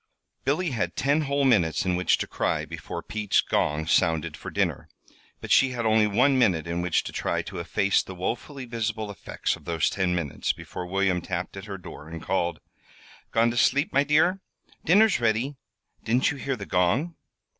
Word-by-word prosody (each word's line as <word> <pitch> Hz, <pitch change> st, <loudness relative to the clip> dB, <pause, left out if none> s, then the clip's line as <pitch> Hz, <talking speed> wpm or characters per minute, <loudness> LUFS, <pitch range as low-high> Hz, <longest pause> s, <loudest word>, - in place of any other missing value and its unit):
Billy 155 Hz, +4 st, +1 dB
had 90 Hz, -8 st, -2 dB
ten 145 Hz, +3 st, +2 dB
whole 140 Hz, -1 st, 0 dB
minutes 95 Hz, -10 st, +3 dB
in 90 Hz, -1 st, +1 dB
which 90 Hz, +1 st, +2 dB
to -, -, -2 dB
cry -, -, -1 dB
before -, -, -7 dB
Pete's 105 Hz, -2 st, 0 dB
gong 75 Hz, +1 st, 0 dB
sounded 80 Hz, -1 st, +1 dB
for -, -, -8 dB
dinner; -, -, -1 dB, 0.5 s
but -, -, -6 dB
she 135 Hz, -1 st, +5 dB
had 120 Hz, -2 st, -3 dB
only 110 Hz, -1 st, +4 dB
one 130 Hz, +6 st, +3 dB
minute 90 Hz, -10 st, +2 dB
in 85 Hz, +1 st, -2 dB
which 90 Hz, -2 st, +1 dB
to -, -, -6 dB
try -, -, -1 dB
to -, -, -7 dB
efface 100 Hz, -1 st, +1 dB
the 95 Hz, -, -9 dB
woefully 125 Hz, -, -4 dB
visible 110 Hz, -3 st, -3 dB
effects 100 Hz, -, -3 dB
of -, -, -17 dB
those 85 Hz, -3 st, 0 dB
ten 90 Hz, -2 st, 0 dB
minutes 80 Hz, -5 st, -1 dB
before 90 Hz, -, -7 dB
William 95 Hz, -1 st, +1 dB
tapped 90 Hz, +1 st, -4 dB
at 95 Hz, 0 st, -7 dB
her 100 Hz, -2 st, -6 dB
door, 80 Hz, -4 st, -11 dB
and 80 Hz, 0 st, -8 dB
called: 85 Hz, -2 st, -1 dB, 0.7 s
"Gone 115 Hz, +1 st, +3 dB
to 120 Hz, -, -5 dB
sleep, 140 Hz, +5 st, +2 dB
my 140 Hz, -, +4 dB
dear? 155 Hz, +6 st, +3 dB, 0.4 s
Dinner's 205 Hz, +5 st, +4 dB
ready. 120 Hz, +4 st, 0 dB, 0.5 s
Didn't 125 Hz, +5 st, +2 dB
you 150 Hz, -, -6 dB
hear 135 Hz, 0 st, -2 dB
the 100 Hz, -4 st, -7 dB
gong?" 100 Hz, -, +1 dB
110 Hz, 190 wpm, -26 LUFS, 90-135 Hz, 0.7 s, she